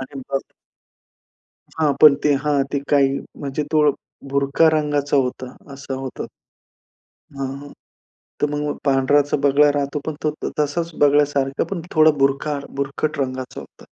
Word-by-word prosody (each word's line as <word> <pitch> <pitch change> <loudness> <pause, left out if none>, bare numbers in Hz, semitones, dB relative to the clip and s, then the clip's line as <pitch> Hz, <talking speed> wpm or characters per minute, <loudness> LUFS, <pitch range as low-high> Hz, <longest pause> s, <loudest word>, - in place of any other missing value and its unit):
आणि 135 +1 -8
मग 135 +1 -5 1.3
हां, 150 -2 +3
पण 150 -2 +9
ते 150 - +4
हां, 145 -2 +2
ते 140 - +1
काही 140 -2 +4 0.3
म्हणजे 140 +1 -3
तो 150 -2 +4 0.4
बुरका 140 +4 +3
रंगाचा 145 -2 0
होता, 130 -1 -2 0.2
असा 135 0 -6
होता. 130 -1 -6 1.2
हां, 140 +1 -5 0.7
तर - - +5
मग 145 0 -2
पांढराचा 140 +1 +2
बगळा 145 +1 +5
राहतो 145 +1 -2
पण 155 - -3
तो 155 - +1 0.3
तसाच 160 +3 -1
बगळ्यासारखं, 145 -1 +2
पण 195 -3 -3
थोडा 155 -1 +6
बुरखा 140 +2 +1 0.2
बुरखट 140 +2 -2
रंगाचं 130 -1 -4
होतं - - -15
145 Hz, 135 wpm, -21 LUFS, 135-150 Hz, 1.3 s, पण